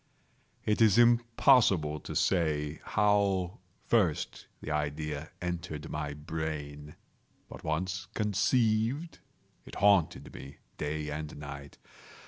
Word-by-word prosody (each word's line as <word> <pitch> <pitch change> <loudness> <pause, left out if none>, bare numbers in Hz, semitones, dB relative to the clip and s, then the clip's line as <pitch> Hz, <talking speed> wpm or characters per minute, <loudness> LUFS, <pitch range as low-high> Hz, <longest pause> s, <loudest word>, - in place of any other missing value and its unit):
It 105 +1 +1
is 110 -2 +6
impossible 115 - +4
to - - -8
say 75 -4 0
how 100 -3 +1 0.3
first 95 -10 0
the 75 - -6
idea 75 +1 -3
entered 85 -3 -4
my 75 -1 -3
brain; 75 -1 -5 0.5
but - - -11
once 90 +4 -2
conceived, 110 - +1 0.4
it - - -11
haunted 100 -5 +2
me 70 +1 -10 0.2
day 75 0 -3
and 75 0 -5
night. 70 -1 -9
80 Hz, 105 wpm, -30 LUFS, 75-105 Hz, 0.5 s, is